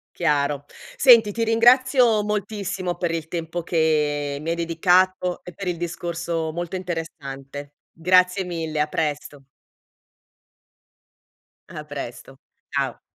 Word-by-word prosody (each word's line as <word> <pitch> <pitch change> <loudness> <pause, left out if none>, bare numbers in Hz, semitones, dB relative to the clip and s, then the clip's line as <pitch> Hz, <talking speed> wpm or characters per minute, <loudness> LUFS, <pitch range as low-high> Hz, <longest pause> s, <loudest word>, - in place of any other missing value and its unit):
Chiaro. 145 -3 0 0.3
Senti, 230 -5 +7
ti 230 +2 -1
ringrazio 240 0 +4
moltissimo 200 -3 -3
per 175 -1 -2
il 160 -1 -4
tempo 165 0 -4
che 150 -4 0
mi 160 +2 -3
hai 170 - 0
dedicato 180 +2 +2
e 180 - -9
per 190 +2 -6
il 175 - -1
discorso 170 -1 -3
molto 175 +2 -5
interessante. 145 -5 -6 0.2
Grazie 180 +3 +3
mille, 165 -3 -3
a 150 - +2
presto. 150 -2 -3 2.2
A 150 - -8
presto, 135 -2 -8 0.4
ciao. - - -2
170 Hz, 115 wpm, -23 LUFS, 150-185 Hz, 2.2 s, Senti